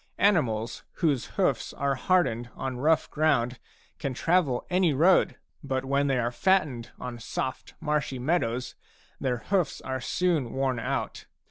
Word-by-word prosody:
Animals 120 - +2
whose 145 -8 0
hoofs - - +1
are 140 0 0
hardened 130 -6 +1
on 130 -1 -4
rough 155 +2 +2
ground 130 -6 +1 0.4
can 135 -2 -3
travel 165 -6 +1
any 180 -4 +2
road; 175 +6 +4 0.3
but 135 -2 -2
when 140 +1 +1
they 135 -2 +2
are 120 -1 0
fattened 145 -5 +1
on 120 -1 -6
soft 130 +3 -4
marshy 150 -3 -1
meadows 125 -3 0 0.5
their 125 -2 0
hoofs 175 - 0
are 130 0 -4
soon 165 -6 0
worn 135 -2 0
out. 115 - -3
135 Hz, 140 wpm, -27 LUFS, 125-160 Hz, 0.5 s, road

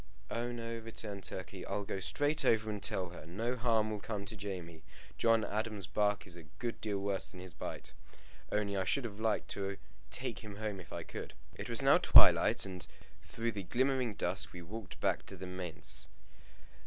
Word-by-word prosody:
"Oh 120 +1 -1
no," 115 -1 -4
returned 110 -3 -5
Turkey. 95 0 -5
"I'll 100 +1 -2
go 95 - -3
straight 145 +11 +1
over 110 -1 +4
and 105 -1 -4
tell 95 -3 +1
her. 90 - -9
No 115 +9 -1
harm 115 -3 +2
will 105 - -2
come 100 -1 -4
to 110 +2 -6
Jamie. 90 -5 -5 0.4
John 115 -2 +5
Adam's 105 -2 -2
bark 105 +5 +1
is 90 -3 -9
a 85 - -8 0.2
good 120 -1 -3
deal 105 -2 -1
worse 100 0 -1
than 90 - -9
his 90 -2 -8
bite. 75 - -6 0.6
Only 100 -1 +1
I 95 - +2
should 125 +9 +1
have 105 -3 -5
liked 110 -1 +1
to 100 -1 -2 0.3
take 125 -2 -1
him 105 -3 -8
home 105 -2 -3
if 85 - -11
I - - -4
could." - - -7 0.2
It - - -6
was - - 0
now - - +7
twilight, - - +8
and 90 -3 -6 0.3
through 115 +6 -2
the 100 -2 -4
glimmering 125 +3 +1
dusk 90 +1 -1
we 85 -1 -7
walked 105 +3 -7
back - - +2
to - - -6
the 95 - -6
manse. 90 -2 -1
105 Hz, 195 wpm, -35 LUFS, 95-115 Hz, 0.6 s, twilight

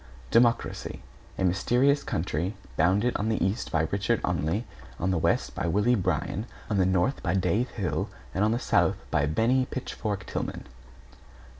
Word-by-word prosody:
=DEMOCRACY= 115 0 +2 0.3
A - - -1
mysterious 125 +10 +3
country, 85 +4 -2 0.2
bounded 100 +9 +2
on 105 +2 -1
the 110 - +1
east 100 +5 -2
by 80 -1 +2
Richard 100 +3 +1
Olney, 90 +6 0 0.3
on 90 +2 +1
the 95 - +1
west - - +1
by 85 - -2
Willie 105 +8 +3
Bryan, 105 0 -1 0.2
on 105 - +2
the 90 - +4
north 95 +9 +1
by 90 0 0
Dave 110 +6 +1
Hill 90 -10 -2 0.2
and 95 - +1
on 110 - +3
the 115 - +1
south - - +2
by 75 - +2
Bennie 120 - +2
Pitchfork 105 -6 -4
Tillman. - - -4
100 Hz, 160 wpm, -27 LUFS, 90-120 Hz, 0.3 s, the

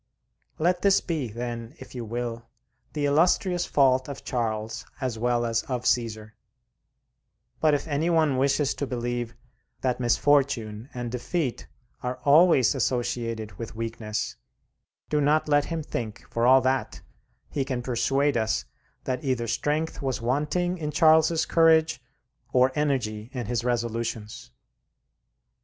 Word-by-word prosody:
Let 175 +3 +1
this 200 -1 +5
be, 160 -7 -3
then, 115 +1 -6
if - - -12
you 125 -2 -5
will, 115 +1 -4 0.5
the 150 -2 -1
illustrious 175 +4 +2
fault 130 -1 +3
of 140 - -7
Charles 110 -3 -2 0.2
as 125 -4 -3
well 120 0 +1
as 115 0 +1
of 125 -2 -3
Caesar; 110 -3 0 1.3
but 155 -2 +4
if 145 - -3
any 155 +3 0
one 155 -5 +3
wishes 140 +1 +2
to 140 - -4
believe 120 -1 -3 0.5
that 125 -1 0
misfortune 120 -3 +1
and 120 -1 -5
defeat 125 +2 -2 0.3
are 125 0 -3
always 150 -3 +6
associated 120 -4 -2
with 115 -1 -6
weakness, 115 -1 -4 0.7
do 150 -1 +1
not 150 +2 +2
let 145 -1 +3
him 165 -2 -3
think, 115 -6 -5
for 115 +1 +1
all 130 +1 +7
that, 130 +1 -1 0.5
he 140 - 0
can 130 -2 -3
persuade 135 +3 +1
us 110 - 0 0.4
that 130 -1 -3
either 130 -4 0
strength 150 +8 -1
was 135 -2 -1
wanting 150 +9 0
in 150 -2 -3
Charles's 160 +1 +4
courage 160 -5 +4 0.5
or 130 +1 +4
energy 125 -7 -1
in 125 -3 -3
his 120 +1 -1
resolutions. 115 - -3
130 Hz, 135 wpm, -26 LUFS, 115-150 Hz, 1.3 s, all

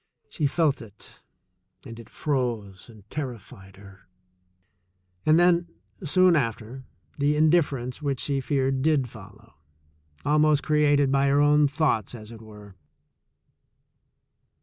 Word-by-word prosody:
She 145 - -1
felt 150 -2 0
it, 105 -3 -13 0.6
and 115 -2 -10
it 115 - -13
froze 120 - -3
and 105 -3 -17
terrified 115 -8 -8
her. 100 0 -17 1.2
And 155 +2 +5
then, 175 0 +3 0.4
soon 185 +2 +4
after, 115 -1 -3 0.3
the 145 +1 +2
indifference 150 -5 +1
which 140 -3 -2
she 140 -2 -2
feared 135 0 -1
did 145 -3 +1
follow 110 0 -15 0.4
— 75 0 -32
almost 150 0 +3
created 145 -2 +2
by 140 0 +2
her 140 +1 +3
own 145 0 +4
thoughts, 140 - -1
as 110 -1 -11
it 115 -1 -12
were. 105 -2 -14
135 Hz, 125 wpm, -25 LUFS, 110-150 Hz, 1.2 s, And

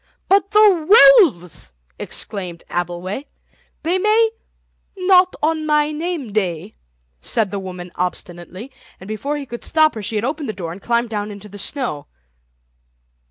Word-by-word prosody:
"But 395 +1 +3
the 425 +3 +7
wolves!" 180 - -2 0.3
exclaimed 180 -5 -4
Abbleway; 175 +8 -4 0.6
"they 350 +4 +1
may—" 440 +3 +3 0.7
"Not 365 0 +4
on 315 0 0
my 300 0 +2
name 305 - -4
day," 190 -1 -2 0.5
said 220 - 0
the 200 - -3
woman 180 -2 -8
obstinately, 180 +5 -5 0.3
and 190 - -12
before 275 +8 -3
he 285 - -6
could 240 -2 -8
stop 310 -1 +3
her 220 - -6
she 210 +2 -3
had 210 +2 0
opened 290 0 -3
the - - -2
door 170 -4 -6
and 185 +4 -10
climbed 235 +1 0
down 210 -1 -3
into 205 0 -10
the 205 +1 -10
snow. 215 - -3
235 Hz, 150 wpm, -19 LUFS, -, 0.7 s, the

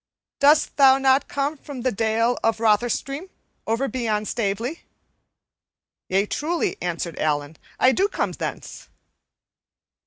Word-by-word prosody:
Dost 295 +2 +4
thou 270 -2 +7
not 270 0 +3
come 285 +2 -2
from 275 -3 -9
the 255 +1 0
Dale 225 +3 +1
of 225 - +2
Rotherstream, 240 - 0 0.4
over 230 +5 0
beyond 220 -5 -2
Stavely?" 230 +8 -2 1.3
"Yea, 195 +2 +2
truly," 320 +9 -1
answered 170 -1 -4
Allan, 145 0 -1 0.2
"I 255 - +5
do 385 +9 +2
come - - -2
thence." - - -7
245 Hz, 120 wpm, -23 LUFS, 210-275 Hz, 1.3 s, thou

